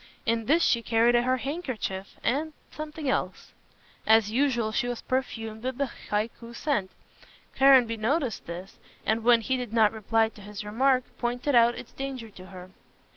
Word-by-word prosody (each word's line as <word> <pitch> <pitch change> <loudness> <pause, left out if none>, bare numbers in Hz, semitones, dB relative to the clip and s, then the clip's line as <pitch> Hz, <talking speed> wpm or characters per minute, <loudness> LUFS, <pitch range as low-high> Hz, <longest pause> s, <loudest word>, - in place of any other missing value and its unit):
In 230 -1 0
this 325 +5 +4
she 235 - +3
carried 230 +1 +3
her 250 +2 +2
handkerchief 255 - -4
and 300 +6 0 0.2
something 305 -1 -6
else. 265 - -2 0.6
As 220 -1 +5
usual, 240 -3 +1
she 240 - 0
was 245 -1 -4
perfumed 225 -4 -3
with 255 +1 -3
the 275 -3 -1 0.2
Hikui 230 +3 -3
scent. 235 -9 -1 0.7
Caranby 260 -4 +5
noticed 255 +2 -1
this, 175 +3 -8 0.3
and 220 +1 +1
when 235 -1 +5
she 260 +3 0
did 245 -3 -5
not 220 -2 +4
reply 225 +1 +1
to 215 - -16
his 205 +1 -7
remark, 255 +4 +2 0.2
pointed 245 +4 -1
out 235 0 +5
its - - -9
danger 265 -5 -6
to 185 -2 -13
her. 185 -1 -11
235 Hz, 165 wpm, -27 LUFS, 220-260 Hz, 0.7 s, As